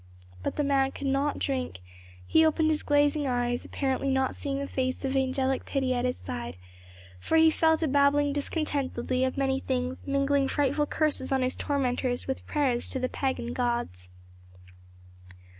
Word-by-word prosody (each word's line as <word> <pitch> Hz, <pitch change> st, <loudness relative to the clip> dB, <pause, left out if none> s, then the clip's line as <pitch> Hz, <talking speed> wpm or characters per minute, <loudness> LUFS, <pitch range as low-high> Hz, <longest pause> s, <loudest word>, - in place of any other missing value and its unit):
But -, -, -3 dB
the 295 Hz, -, 0 dB
man 275 Hz, -1 st, +2 dB
could 280 Hz, -, -6 dB
not 275 Hz, +2 st, +1 dB
drink; 260 Hz, -, -2 dB, 0.5 s
he 320 Hz, -, +4 dB
opened 315 Hz, 0 st, +3 dB
his 305 Hz, -, 0 dB
glazing 290 Hz, 0 st, +2 dB
eyes, 245 Hz, -1 st, 0 dB
apparently 270 Hz, 0 st, -1 dB
not 265 Hz, -1 st, +1 dB
seeing 275 Hz, -2 st, -3 dB
the 280 Hz, -, -2 dB
face 260 Hz, 0 st, -2 dB
of 270 Hz, 0 st, -1 dB
angelic 265 Hz, 0 st, 0 dB
pity 265 Hz, -2 st, 0 dB
at 245 Hz, 0 st, 0 dB
his 250 Hz, -, -1 dB
side, 80 Hz, -1 st, -6 dB, 0.6 s
for 320 Hz, -, +1 dB
he 320 Hz, 0 st, +6 dB
fell 320 Hz, 0 st, +3 dB
to 320 Hz, -, -1 dB
babbling 285 Hz, +1 st, +3 dB
disconnectedly 280 Hz, -4 st, -1 dB
of 260 Hz, +1 st, -1 dB
many 270 Hz, -1 st, +1 dB
things, 255 Hz, 0 st, -3 dB
mingling 275 Hz, 0 st, +2 dB
frightful 290 Hz, +1 st, +1 dB
curses 300 Hz, -4 st, -1 dB
on 265 Hz, -1 st, +2 dB
his 255 Hz, -, 0 dB
tormentors 255 Hz, -3 st, -1 dB
with 265 Hz, -, -4 dB
prayers 265 Hz, -5 st, 0 dB
to -, -, -4 dB
the 255 Hz, 0 st, -1 dB
pagan 260 Hz, -3 st, -2 dB
gods. 235 Hz, -, -2 dB
270 Hz, 165 wpm, -28 LUFS, 255-285 Hz, 0.6 s, he